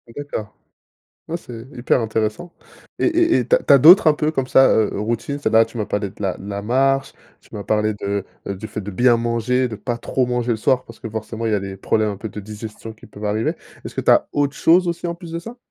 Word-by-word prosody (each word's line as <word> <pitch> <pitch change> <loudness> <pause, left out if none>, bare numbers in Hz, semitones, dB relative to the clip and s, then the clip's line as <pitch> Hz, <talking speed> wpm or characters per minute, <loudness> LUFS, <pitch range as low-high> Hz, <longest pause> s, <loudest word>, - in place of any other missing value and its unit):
D'accord. 140 -7 -6 0.7
Ouais, 170 - -2
c'est 120 -7 -10
hyper 125 0 +1
intéressant 110 +9 -2 0.5
et - - +1
et 340 0 +3
et - - -2
tu - - +4
as - - +5
tu - - +3
as 140 - +8
d'autres 170 - +8
un - - +6
peu 155 +1 -1
comme 135 -3 -2
ça, 135 - +6
heu 110 -1 +2
heu, 100 - -4
routine, 120 +6 -2
c'est-à-dire, 115 -5 +2
là - - +6
tu 115 +1 -10
m'as 105 - -2
parlé 105 -2 -2
de 105 - -22
la 95 -3 -1
de 100 - -10
la 100 0 -4
marche, 135 +4 +1 0.3
tu - - -24
m'as 105 - -5
parlé 105 0 0
de 100 -1 -3 0.2
du 100 +2 -5
fait 105 - -6
de 105 +1 -6
bien 120 +5 +4
manger, 120 +2 0
de 110 - -6
pas 120 +2 -4
trop 125 +1 -1
manger 125 -1 -1
le 115 - +1
soir, 125 +4 +1
parce 115 - -14
que 115 - -7
forcément 110 +1 -5
il 110 - 0
y - - +3
a 100 - 0
des 95 0 -6
problèmes 110 +2 0
un 100 - -5
peu 110 +2 -6
de 105 - -8
digestion 110 +2 -8
qui 110 - -16
peuvent 105 +1 -10
arriver. 105 +2 0 0.3
Est-ce - - -8
que - - -1
tu - - +2
as - - +5
autre 145 0 0
chose 175 +2 +4
aussi 170 +1 -3
en 170 - -2
plus 170 -1 -11
de 165 - -3
ça? 230 +8 -9
115 Hz, 270 wpm, -20 LUFS, 105-135 Hz, 0.7 s, as